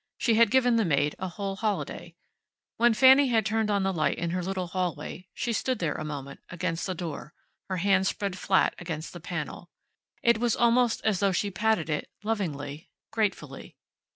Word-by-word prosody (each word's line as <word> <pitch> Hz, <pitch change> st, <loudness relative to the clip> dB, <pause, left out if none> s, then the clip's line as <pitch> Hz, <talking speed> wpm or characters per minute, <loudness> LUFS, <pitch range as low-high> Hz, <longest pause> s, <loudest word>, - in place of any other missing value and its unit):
She 230 Hz, -, +2 dB
had 230 Hz, 0 st, +5 dB
given 245 Hz, -1 st, +3 dB
the 225 Hz, -, +3 dB
maid 145 Hz, -4 st, +1 dB
a 190 Hz, -, -3 dB
whole 195 Hz, +1 st, -4 dB
holiday. 190 Hz, -5 st, -3 dB, 0.6 s
When 235 Hz, -1 st, +4 dB
Fanny 265 Hz, +3 st, +7 dB
had 225 Hz, -4 st, +2 dB
turned 220 Hz, 0 st, 0 dB
on 200 Hz, -1 st, +1 dB
the 195 Hz, 0 st, 0 dB
light 155 Hz, -3 st, 0 dB
in 170 Hz, -1 st, -2 dB
her 180 Hz, +1 st, -1 dB
little 185 Hz, 0 st, -2 dB
hallway 180 Hz, +1 st, -4 dB
she 235 Hz, -, -2 dB
stood 255 Hz, +3 st, 0 dB
there 165 Hz, -6 st, -1 dB
a -, -, -5 dB
moment, 140 Hz, -2 st, -6 dB
against 175 Hz, 0 st, -3 dB
the 185 Hz, -, -3 dB
door, 160 Hz, -3 st, -6 dB, 0.3 s
her 185 Hz, -, -1 dB
hand 190 Hz, +1 st, +3 dB
spread 200 Hz, -2 st, -2 dB
flat 190 Hz, +1 st, +2 dB
against 165 Hz, -3 st, -5 dB
the 175 Hz, -, -8 dB
panel. 175 Hz, 0 st, -6 dB, 0.5 s
It 235 Hz, -2 st, +4 dB
was 235 Hz, -2 st, +1 dB
almost 240 Hz, 0 st, +3 dB
as 210 Hz, -5 st, +2 dB
though 200 Hz, -1 st, +2 dB
she 200 Hz, +2 st, -1 dB
patted 215 Hz, -4 st, +1 dB
it, 150 Hz, -2 st, -2 dB
lovingly, 160 Hz, -8 st, -3 dB, 0.2 s
gratefully. 215 Hz, -3 st, -3 dB
190 Hz, 185 wpm, -27 LUFS, 170-220 Hz, 0.6 s, Fanny